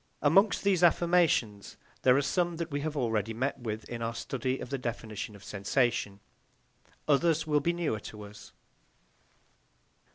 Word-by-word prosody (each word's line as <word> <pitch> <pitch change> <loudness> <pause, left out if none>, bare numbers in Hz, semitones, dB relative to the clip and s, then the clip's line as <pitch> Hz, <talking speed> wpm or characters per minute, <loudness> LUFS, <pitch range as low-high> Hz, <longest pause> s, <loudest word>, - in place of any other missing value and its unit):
Amongst 185 +6 +4
these 195 -3 +2
affirmations 170 - +2 0.2
there 125 0 +5
are 140 - +2
some 175 +3 0
that 165 -1 -4
we 145 0 -2
have 155 0 -3
already 115 -3 -1
met 130 +3 -2
with 110 -3 -5
in 120 -1 -6
our 115 +1 -2
study 130 +1 -2
of - - -8
the 135 - -2
definition 110 -3 -5
of 100 - -14
sensation; 100 -1 -1 0.9
others 160 +2 +3
will 150 -1 +2
be 170 - +1
newer 170 -10 -2
to 105 0 -9
us. 100 0 -12
130 Hz, 155 wpm, -29 LUFS, 110-160 Hz, 0.9 s, there